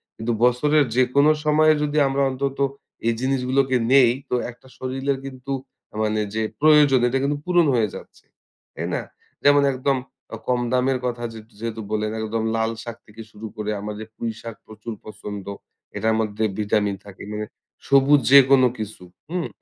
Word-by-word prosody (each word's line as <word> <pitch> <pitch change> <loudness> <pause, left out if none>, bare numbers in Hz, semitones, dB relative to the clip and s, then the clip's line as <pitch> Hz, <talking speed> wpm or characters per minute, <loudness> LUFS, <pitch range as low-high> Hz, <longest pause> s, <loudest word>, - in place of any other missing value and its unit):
কিন্তু 110 +2 -3
বছরের 145 +5 +4
যেকোনো 130 +4 +4
সময়ে 155 +1 +5
যদি 150 0 -1
আমরা 135 +1 0
অন্তত 135 +1 -3 0.5
এই 115 - +3
জিনিসগুলোকে 130 0 +1 0.2
নেই, 130 -4 +7 0.2
তো - - +1 0.2
একটা 125 +2 -20
শরীরের 135 +1 -2
কিন্তু 135 +1 -6 0.5
মানে 110 0 0
যে, 110 - -1 0.2
প্রয়োজন 150 -3 +6
এটা 125 +2 0
কিন্তু 145 +1 0
পূরণ 175 -2 +4
হয়ে 110 -3 +2
যাচ্ছে, - - -12 0.5
তাই - - -3
না? - - -1 0.4
যেমন 145 0 +6
একদম 130 +1 0 0.5
কম 125 -1 +1
দামের 130 +1 +2
কথা 120 -1 -3
যে, 110 - -8 0.2
যেহেতু 115 0 -4
বলে 110 0 0
গেল 110 - -4
একদম 110 +1 -2
লাল 110 0 0
শাক 115 -1 -7
থেকে 110 +1 -11
শুরু 110 +1 -8
করে 105 0 -3
আমাদের 105 +1 -6
পুঁই 115 - -3
শাক 115 -1 -7
প্রচুর 110 +2 -8
পছন্দ। 105 -2 -8 0.5
এটার 110 0 +1
মধ্যে 110 0 -1 0.2
ভিটামিন 105 -1 +1
থাকে, 100 -2 -11
মানে 105 0 -3 0.4
সবুজ 140 +1 +5
যেকোনো 135 -2 +7
কিছু, 110 -3 -6 0.3
হুম। 180 0 -2
125 Hz, 160 wpm, -23 LUFS, 110-140 Hz, 0.5 s, নেই